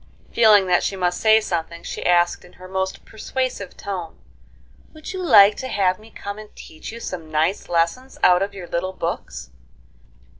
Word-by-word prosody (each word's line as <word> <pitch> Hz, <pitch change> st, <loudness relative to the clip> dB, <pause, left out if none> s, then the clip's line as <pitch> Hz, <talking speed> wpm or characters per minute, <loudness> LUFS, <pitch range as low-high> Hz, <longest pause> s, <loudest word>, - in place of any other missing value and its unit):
Feeling 215 Hz, -4 st, +6 dB
that 180 Hz, -1 st, +3 dB
she 195 Hz, -, -2 dB
must 180 Hz, -1 st, -1 dB
say 220 Hz, 0 st, +6 dB
something, 170 Hz, -4 st, -4 dB
she -, -, -6 dB
asked, 175 Hz, 0 st, +2 dB
in 175 Hz, -, -17 dB
her 185 Hz, -, -13 dB
most 190 Hz, 0 st, -3 dB
persuasive 235 Hz, -3 st, -4 dB
tone: 180 Hz, -5 st, -6 dB, 0.8 s
"Would 310 Hz, +4 st, -8 dB
you 375 Hz, -, -4 dB
like 210 Hz, -, +7 dB
to 260 Hz, -, -5 dB
have 185 Hz, -6 st, +1 dB
me 220 Hz, +1 st, -15 dB
come 200 Hz, -1 st, -7 dB
and 215 Hz, -1 st, -11 dB
teach 155 Hz, +5 st, -10 dB
you 230 Hz, -, -8 dB
some 170 Hz, -8 st, -6 dB
nice 160 Hz, +5 st, 0 dB
lessons 175 Hz, +11 st, -1 dB
out 180 Hz, 0 st, +6 dB
of 200 Hz, 0 st, -2 dB
your 185 Hz, -2 st, -7 dB
little 185 Hz, +3 st, -2 dB
books?" -, -, -5 dB
190 Hz, 180 wpm, -22 LUFS, 175-215 Hz, 0.8 s, like